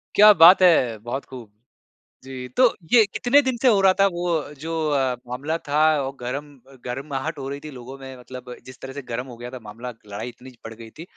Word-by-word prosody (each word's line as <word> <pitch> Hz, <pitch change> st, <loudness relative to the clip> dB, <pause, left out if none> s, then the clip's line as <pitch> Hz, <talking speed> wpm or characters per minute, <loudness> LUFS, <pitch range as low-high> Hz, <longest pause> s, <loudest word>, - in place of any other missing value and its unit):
क्या 210 Hz, +1 st, +9 dB
बात 175 Hz, +4 st, +8 dB
है। 140 Hz, -11 st, +4 dB
बहुत 130 Hz, +4 st, -5 dB
खूब। 120 Hz, -5 st, -11 dB, 0.7 s
जी, 130 Hz, -1 st, -8 dB
तो 255 Hz, -, +5 dB, 0.3 s
ये 225 Hz, -3 st, +7 dB
कितने 255 Hz, +7 st, +2 dB
दिन 260 Hz, -3 st, -2 dB
से 260 Hz, -, +3 dB
हो 210 Hz, -5 st, +5 dB
रहा 190 Hz, -1 st, +5 dB
था 195 Hz, -, +6 dB
वो 170 Hz, -4 st, -2 dB
जो 165 Hz, +2 st, -5 dB, 0.2 s
अ, 135 Hz, -3 st, 0 dB
मामला 145 Hz, +7 st, -3 dB
था 145 Hz, +1 st, 0 dB, 0.2 s
और 135 Hz, +1 st, -5 dB
गरम 130 Hz, +4 st, -4 dB, 0.4 s
गरमाहट 135 Hz, +4 st, -4 dB
हो 135 Hz, -, -6 dB
रही 140 Hz, 0 st, -5 dB
थी 155 Hz, -, -8 dB
लोगों 130 Hz, +1 st, -10 dB
में 130 Hz, -1 st, -9 dB
मतलब 125 Hz, 0 st, -10 dB
जिस 130 Hz, 0 st, -13 dB
तरह 135 Hz, 0 st, -8 dB
से 145 Hz, -, -6 dB
गरम 125 Hz, +3 st, -4 dB
हो 120 Hz, -2 st, -11 dB
गया 120 Hz, +1 st, -8 dB
था 130 Hz, -, -8 dB
मामला 120 Hz, +4 st, -8 dB, 0.2 s
लड़ाई 105 Hz, +4 st, -6 dB
इतनी 130 Hz, +2 st, -14 dB
बढ़ 115 Hz, -, -7 dB
गई 115 Hz, 0 st, -12 dB
थी, 160 Hz, -, -11 dB
135 Hz, 220 wpm, -23 LUFS, 125-165 Hz, 0.7 s, क्या